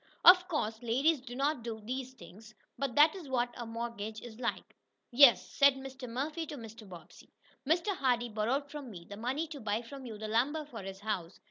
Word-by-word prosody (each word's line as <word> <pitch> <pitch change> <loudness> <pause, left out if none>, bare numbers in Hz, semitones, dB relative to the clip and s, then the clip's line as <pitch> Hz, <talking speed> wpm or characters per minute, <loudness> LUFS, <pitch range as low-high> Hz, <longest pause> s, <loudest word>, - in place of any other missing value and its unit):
Of 360 0 +9
course 225 -10 -2
ladies 265 +6 +2
do 245 -2 -9
not 280 0 0
do 225 -1 -5
those 255 +4 -5
things, 215 +1 -14 0.2
but 275 -4 -3
that 305 +3 +6
is 340 -8 -9
what 245 -2 0
a 240 -2 -6
mortgage 225 -2 -5
is 235 -1 -10
like. 235 - -3 0.4
"Yes." 240 -6 +7
said 280 -1 +5
Mr. 265 -1 -8
Murphy 300 +7 -3
to 295 - -6
Mr. 225 -3 -10
Bobbsey, 170 -2 -13 0.4
"Mr. 345 +6 +2
Hardee 245 -5 +1
borrowed 235 +7 -1
from 290 -4 -7
me 175 -5 -10
the 200 - -8
money 255 +9 -2
to 300 -3 -7
buy 215 0 -1
from 265 +2 -9
you 220 -2 -7
the 215 +1 -5
lumber 270 +8 +1
for 235 -7 -8
his 195 0 -8
house. 195 -5 -3
245 Hz, 205 wpm, -32 LUFS, 220-280 Hz, 0.4 s, Of